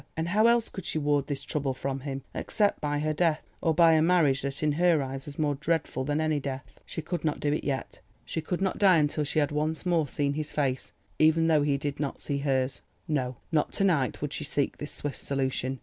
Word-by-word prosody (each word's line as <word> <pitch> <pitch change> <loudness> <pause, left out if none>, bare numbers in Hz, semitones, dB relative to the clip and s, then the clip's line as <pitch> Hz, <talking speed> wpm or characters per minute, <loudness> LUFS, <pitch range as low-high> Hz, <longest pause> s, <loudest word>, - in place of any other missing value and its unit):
And 160 +1 -1
how 215 +5 +4
else 235 -1 +3
could 190 - -7
she - - -2
ward 145 -2 +1
this 145 -3 -3
trouble 140 -3 -2
from 135 +1 -3
him 135 -1 -5
except 205 -2 0
by 145 0 0
her 155 +1 0
death, 160 -1 +1 0.2
or 165 - +2
by 165 0 +6
a 160 - +4
marriage 160 -6 +3
that 140 +2 -4
in 150 - +3
her 170 +1 +3
eyes 135 +1 -6
was 140 - -8
more 150 -2 +1
dreadful 150 -2 -1
than 145 +2 0
any 155 -1 +1
death? 135 -1 -6
She 160 - -5
could 175 +2 -3
not 155 -2 0
do 145 0 +1
it 150 - -2
yet. 135 -2 -3 0.3
She 160 +6 -3
could 175 +3 -3
not 190 - -1
die 190 -4 +6
until 150 0 +1
she 145 - -3
had 145 -2 +2
once 155 +3 -1
more 170 -4 +2
seen 140 +1 -1
his 150 0 -4
face, 135 -3 -1 0.3
even 160 +1 +4
though 160 -2 +4
he 145 -1 +1
did 145 0 -4
not 145 -2 -3
see 140 -1 -2
hers. 135 -2 0 0.3
No, 130 -5 -1 0.2
not 155 -2 +1
to - - 0
night 150 -9 +1
would 150 0 -3
she - - -3
seek 145 -1 -1
this 145 - -5
swift 145 -1 -4
solution. 130 -1 -2
150 Hz, 240 wpm, -28 LUFS, 140-160 Hz, 0.3 s, by